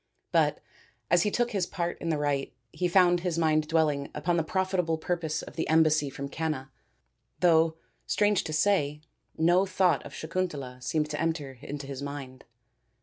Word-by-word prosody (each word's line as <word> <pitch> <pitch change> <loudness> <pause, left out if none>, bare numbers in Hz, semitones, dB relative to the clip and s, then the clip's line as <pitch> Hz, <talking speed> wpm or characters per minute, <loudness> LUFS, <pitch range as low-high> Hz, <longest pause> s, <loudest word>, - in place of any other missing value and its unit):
But - - +2 0.5
as 175 - +5
he 210 - +2
took 240 +3 0
his 195 -4 0
part 175 -2 -3
in 165 - -2
the 160 - +1
rite 145 -3 -1 0.2
he 180 - -1
found 175 0 +4
his 175 -2 -2
mind 155 -2 +2
dwelling 155 -3 +1
upon 165 +4 0
the 165 - +2
probable 185 -1 0
purpose 160 -2 -2
of - - -11
the 165 - -2
embassy 155 -2 +4
from 140 +1 -6
Canna, 145 -3 -3 0.7
though, 165 -2 +4 0.3
strange 205 -2 +2
to 160 - -4
say, 155 -4 +1 0.4
no 175 +4 +4
thought 185 -5 +2
of 145 - -10
Sakun 185 +3 -2
tala 130 -5 -8
seemed 150 +4 -1
to - - -3
enter 150 -6 -2
into 145 0 -6
his 135 -1 -6
mind. 140 -2 -7
160 Hz, 175 wpm, -28 LUFS, 145-175 Hz, 0.7 s, as